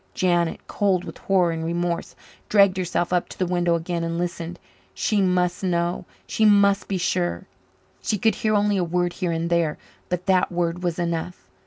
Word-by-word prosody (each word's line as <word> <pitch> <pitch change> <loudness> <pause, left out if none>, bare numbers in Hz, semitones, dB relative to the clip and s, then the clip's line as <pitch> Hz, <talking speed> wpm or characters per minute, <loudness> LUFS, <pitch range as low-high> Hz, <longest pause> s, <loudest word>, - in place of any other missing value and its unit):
Janet, 175 -2 +1
cold 190 -3 +1
with - - -9
horror 185 -3 +2
and 165 0 -3
remorse, 170 +1 -2 0.3
dragged 200 -2 +5
herself 180 -1 -1
up 180 - +1
to - - -10
the 185 - 0
window 175 -1 +1
again 170 0 -2
and 165 0 -2
listened. 175 0 -4 0.4
She 205 - +1
must 180 -1 +1
know 175 -1 0 0.2
she 220 - -1
must 200 -2 +4
be 195 - -1
sure. 85 - -1 0.6
She 210 - 0
could 220 +2 +2
hear 215 +1 0
only 205 0 +2
a 185 - +1
word 175 +1 0
here 180 -2 -2
and 165 0 -1
there, 170 -3 +1 0.3
but 180 0 -2
that 185 -2 +2
word 175 0 -1
was 175 -2 -1
enough. 170 - -3
175 Hz, 185 wpm, -23 LUFS, 170-185 Hz, 0.6 s, dragged